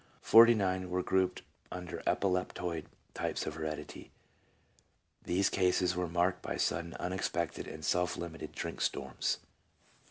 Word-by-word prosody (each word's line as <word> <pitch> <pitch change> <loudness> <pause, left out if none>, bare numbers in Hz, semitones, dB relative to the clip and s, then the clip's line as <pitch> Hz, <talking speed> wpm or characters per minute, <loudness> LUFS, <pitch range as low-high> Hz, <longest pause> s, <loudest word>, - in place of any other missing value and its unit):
Forty 115 +1 +8
nine 95 -3 0
were 90 0 0
grouped 95 0 +1 0.3
under 90 -1 -5
epileptoid 90 -3 0 0.3
types - - -2
of 80 - -3
heredity. 75 -1 -6 0.6
" - - -37
These 95 +2 +3
cases 90 -1 +2
were 90 0 -1
marked 90 +2 +1
by - - -3
sudden, 85 0 -1
unexpected, 90 -2 -2
and 80 -1 -7
self 90 +4 +1
limited 85 -2 -6
drink - - -5
storms." 65 -2 -1
90 Hz, 130 wpm, -33 LUFS, 85-95 Hz, 0.6 s, Forty